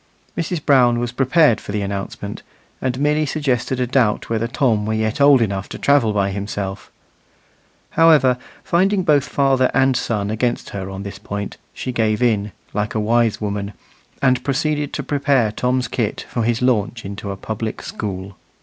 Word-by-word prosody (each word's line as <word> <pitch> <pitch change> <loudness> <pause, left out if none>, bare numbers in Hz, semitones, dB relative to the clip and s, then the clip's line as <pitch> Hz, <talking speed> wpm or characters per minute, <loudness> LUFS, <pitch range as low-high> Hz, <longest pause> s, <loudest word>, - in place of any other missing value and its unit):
Mrs. 165 -1 -3
Brown 125 -4 +5
was 120 0 -2
prepared 135 0 +3
for - - -7
the 105 0 -1
announcement, 100 0 -5 0.4
and 130 0 -1
merely 150 +2 +2
suggested 130 -3 -1
a 125 - +2
doubt 120 -4 +1
whether 115 0 0
Tom 120 -4 +1
were 110 - 0
yet 110 +4 -1
old 140 -4 +6
enough 100 -3 -3
to - - -6
travel 140 -6 +3
by 100 -1 0
himself. 100 -1 -5 1.0
However, 150 -6 +5 0.2
finding 190 +3 +2
both 150 -5 +3
father 135 -2 +2
and 135 0 +3
son 105 -4 -1
against 120 +2 -1
her 95 -1 -5
on 95 0 -6
this 100 -1 -7
point, 100 0 -5
she 130 - -5
gave 110 -1 +1
in, 105 -4 +1 0.2
like 105 +2 -2
a - - +1
wise 115 +1 +2
woman, 100 -1 -3 0.5
and 130 -2 +3
proceeded 150 +2 -1
to - - -3
prepare 140 -6 +1
Tom's 125 +2 0
kit - - -2
for 120 - -2
his 115 +1 0
launch 115 -2 0
into 100 +1 -6
a 100 - -4
public 110 +2 -5
school. 95 -1 -5
120 Hz, 170 wpm, -20 LUFS, 105-135 Hz, 1.0 s, old